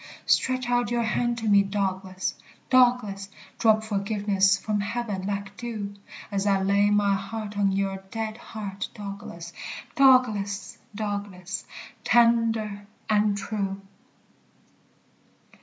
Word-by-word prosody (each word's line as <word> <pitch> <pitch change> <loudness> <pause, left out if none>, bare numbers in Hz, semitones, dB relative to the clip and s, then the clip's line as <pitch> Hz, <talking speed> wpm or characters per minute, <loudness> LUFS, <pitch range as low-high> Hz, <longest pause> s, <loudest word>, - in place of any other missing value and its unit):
Stretch 255 -1 +2
out 245 0 +1
your 240 0 +1
hand 240 +2 0
to 225 -1 -3
me, 200 -1 +6
Douglas, 190 -2 -2 0.4
Douglas, 245 -6 +3 0.3
Drop 220 -1 +4
forgiveness 200 -2 +2
from 210 +1 -1
heaven 205 -2 -3
like 200 0 -3
dew; 220 -4 -5 0.4
As 200 0 0
I 195 -1 +3
lay 200 +1 +3
my 205 -1 +3
heart 205 +2 -4
on 200 -1 +2
your 195 0 0
dead 220 0 -4
heart, 205 -4 -6
Douglas, 200 -5 -7 0.4
Douglas, 250 -8 +3 0.2
Douglas, 200 -3 -4 0.4
tender 225 -3 +3 0.2
and 210 -1 +3
true! 200 -1 -3
205 Hz, 110 wpm, -26 LUFS, 195-225 Hz, 0.4 s, me